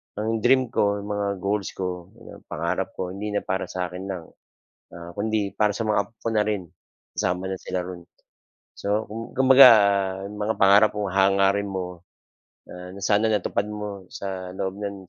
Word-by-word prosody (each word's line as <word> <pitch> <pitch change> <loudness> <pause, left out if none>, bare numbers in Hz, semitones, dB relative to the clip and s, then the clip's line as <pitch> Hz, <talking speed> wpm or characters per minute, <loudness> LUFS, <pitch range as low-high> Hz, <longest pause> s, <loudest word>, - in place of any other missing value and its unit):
ang 110 +2 -2
dream 130 +1 +3
ko, 100 -2 +1
mga 105 -1 -2 0.2
goals 100 0 -1
ko, 90 -2 -4
mga 115 - -13
pangarap - - -2
ko, 90 -1 -3
hindi 105 +2 -5
na - - +1
para 95 0 -2
sa 90 -1 -3
akin 90 +2 -7
lang. 90 -4 -5 0.7
Ah, 85 0 -9
kundi 105 -1 -1
para 105 -1 +3
sa 115 - -3
mga 105 -1 +3
apo - - -23
ko - - -3
na 105 - +4
rin, 100 -4 -2 0.5
kasama 90 +1 -1
na 95 - -2
sila 90 0 -4
roon. 90 -2 -8 0.7
So, 105 +2 -1
kum 115 +2 -7
kumbaga, 130 0 +9 0.6
'yung 100 - -8
mga 110 +1 0
pangarap 100 +2 +6
o 105 - -1
hangarin 100 +1 +3
mo 90 -2 -5 0.7
na, 90 0 -9
na 100 - -9
sana 105 +2 +3
natupad 100 0 0
mo 105 -2 -6
sa 95 -2 -5
loob 95 0 -3
ng 100 -3 -6
100 Hz, 180 wpm, -24 LUFS, 95-105 Hz, 0.7 s, kumbaga